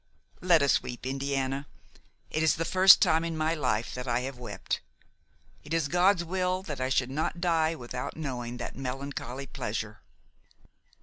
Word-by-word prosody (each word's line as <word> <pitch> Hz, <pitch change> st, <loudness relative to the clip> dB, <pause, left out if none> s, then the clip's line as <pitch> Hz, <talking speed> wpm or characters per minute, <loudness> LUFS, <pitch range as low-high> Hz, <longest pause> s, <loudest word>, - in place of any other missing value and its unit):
Let 170 Hz, -5 st, +5 dB
us 140 Hz, -, +3 dB
weep, 125 Hz, 0 st, -7 dB
Indiana; 135 Hz, +1 st, -2 dB, 0.6 s
it 155 Hz, -, 0 dB
is 160 Hz, -, +4 dB
the 165 Hz, -, -2 dB
first 190 Hz, +4 st, +7 dB
time 165 Hz, -3 st, +3 dB
in 165 Hz, -1 st, -3 dB
my 155 Hz, +1 st, +1 dB
life 125 Hz, -7 st, -1 dB
that 125 Hz, +1 st, -5 dB
I 120 Hz, 0 st, +1 dB
have 130 Hz, 0 st, -6 dB
wept; 125 Hz, -, -4 dB, 0.8 s
it 150 Hz, +2 st, -3 dB
is 165 Hz, -3 st, +1 dB
God's 180 Hz, +3 st, +3 dB
will 185 Hz, +1 st, -1 dB
that 150 Hz, -8 st, -5 dB
I 130 Hz, -, 0 dB
should 130 Hz, -1 st, +1 dB
not 155 Hz, +4 st, -2 dB
die 165 Hz, -2 st, +2 dB
without 125 Hz, 0 st, -6 dB
knowing 125 Hz, -5 st, -4 dB
that -, -, -6 dB
melancholy 135 Hz, 0 st, -5 dB
pleasure." -, -, -5 dB
140 Hz, 165 wpm, -29 LUFS, 130-165 Hz, 0.8 s, first